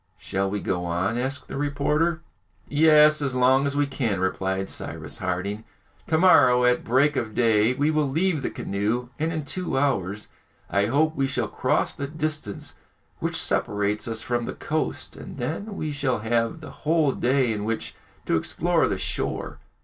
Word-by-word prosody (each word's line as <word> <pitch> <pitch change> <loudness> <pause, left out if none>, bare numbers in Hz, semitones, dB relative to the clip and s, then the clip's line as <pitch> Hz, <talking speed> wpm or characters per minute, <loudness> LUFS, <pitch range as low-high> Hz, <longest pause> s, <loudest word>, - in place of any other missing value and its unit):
"Shall, 95 0 -2
we 100 0 -3
go 90 -2 -1
on?" 85 +5 -1
asked 130 +2 -3
the - - -6
reporter. 150 +3 0 0.5
"Yes, 150 0 +5
as 135 -3 -1
long 130 +2 +4
as 140 - -2
we 145 0 +2
can," 120 -8 -1
replied 95 +1 -1
Cyrus - - -5
Harding. 95 +4 -2 0.4
"To 160 - +2
morrow, 130 -8 +6
at 125 0 +3
break 135 +5 +3
of 110 -2 -3
day, 115 0 +3
we 145 +3 +2
will 155 -2 +1
leave 160 +2 +1
the - - -2
canoe, 110 +5 -2
and 160 +2 0
in 155 -3 -3
two 160 -1 -2
hours 105 -7 -1 0.4
I 100 +1 +2
hope 155 +6 +2
we 135 -2 +1
shall 130 - -1
cross - - 0
the 140 - -4
distance 155 -7 -4 0.4
which - - -2
separates 105 +1 0
us 115 -1 -3
from 120 -1 -1
the - - -4
coast, - - -3
and - - -9
then 165 - -4
we 155 -4 -3
shall 140 -3 0
have 115 +7 0
the 155 - -9
whole 155 -2 +2
day 130 -2 +1
in 105 -1 -3
which 115 +1 -3 0.3
to - - +2
explore - - +1
the - - -1
shore." - - -3
130 Hz, 175 wpm, -25 LUFS, 105-150 Hz, 0.5 s, morrow